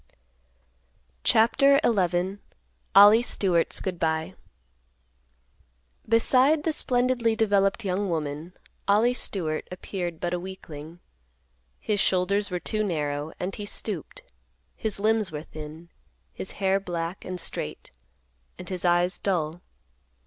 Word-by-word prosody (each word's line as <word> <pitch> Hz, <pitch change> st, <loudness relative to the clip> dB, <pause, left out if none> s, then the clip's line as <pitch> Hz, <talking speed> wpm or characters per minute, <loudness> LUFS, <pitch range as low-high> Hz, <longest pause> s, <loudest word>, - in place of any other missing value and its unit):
CHAPTER 275 Hz, +5 st, +5 dB
XI. 185 Hz, -2 st, +1 dB, 0.6 s
OLLIE 205 Hz, +3 st, +9 dB
STEWART'S 185 Hz, -8 st, +1 dB
GOOD 180 Hz, -3 st, -3 dB
BY. 160 Hz, +2 st, -1 dB, 1.8 s
Beside 260 Hz, +6 st, +4 dB
the 320 Hz, -, 0 dB
splendidly 245 Hz, -4 st, +1 dB
developed 205 Hz, -1 st, +2 dB
young 195 Hz, +1 st, -1 dB
woman, 155 Hz, +1 st, -3 dB, 0.3 s
Ollie 215 Hz, +5 st, +4 dB
Stewart 165 Hz, -10 st, -2 dB
appeared 180 Hz, -2 st, -5 dB
but 175 Hz, 0 st, -2 dB
a 180 Hz, -, -1 dB
weakling. 170 Hz, -3 st, -9 dB, 0.8 s
His 210 Hz, -1 st, -1 dB
shoulders 195 Hz, +3 st, +1 dB
were 180 Hz, -1 st, -2 dB
too 215 Hz, +4 st, -1 dB
narrow 150 Hz, -5 st, -2 dB
and 185 Hz, +2 st, -3 dB
he 205 Hz, -, -5 dB
stooped; -, -, -5 dB, 0.5 s
his 215 Hz, -3 st, -3 dB
limbs 215 Hz, -2 st, +1 dB
were 150 Hz, 0 st, -5 dB
thin; 155 Hz, +2 st, -10 dB, 0.4 s
his -, -, -6 dB
hair 195 Hz, 0 st, +1 dB
black 175 Hz, -1 st, -4 dB
and 185 Hz, 0 st, -4 dB
straight; -, -, -4 dB, 0.7 s
and 180 Hz, -, -9 dB
his 185 Hz, -2 st, -3 dB
eyes 175 Hz, +1 st, +2 dB
dull. 170 Hz, -3 st, -1 dB
190 Hz, 115 wpm, -26 LUFS, 170-215 Hz, 1.8 s, OLLIE